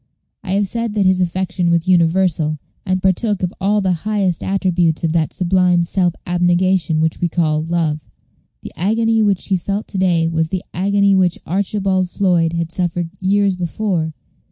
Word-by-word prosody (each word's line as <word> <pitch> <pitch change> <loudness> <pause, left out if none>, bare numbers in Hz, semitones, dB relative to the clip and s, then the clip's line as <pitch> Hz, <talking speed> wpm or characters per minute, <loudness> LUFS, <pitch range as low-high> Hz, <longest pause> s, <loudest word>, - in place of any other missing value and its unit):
I 185 - -3
have 200 +1 +2
said 230 +1 -3
that 200 -2 +2
his 185 0 +3
affection 180 0 -1
was 170 +1 +1
universal, 170 -3 +2 0.3
and 185 0 0
partook 190 +1 +1
of 180 - -1
all 205 +2 +2
the 190 -1 +1
highest 200 -5 -1
attributes 180 -4 0
of 165 - +1
that 160 -2 0
sublime 180 -1 +2
self 175 0 0
abnegation 175 -1 +1
which 160 0 -1
we 175 - +2
call 155 -2 0
Love. 160 -2 -2 0.5
The - - -9
agony 225 +5 +1
which 205 -3 0
he 190 - +2
felt 200 +4 -4
to 195 - -4
day 170 -3 +2
was 160 -1 0
the 185 0 -3
agony 200 +1 +2
which 180 -2 +2
Archibald 190 0 0
Floyd 175 -4 +1
had 170 -1 -2
suffered 175 -1 -2
years 200 0 +2
before. 175 -3 -2
180 Hz, 170 wpm, -18 LUFS, 170-195 Hz, 0.5 s, his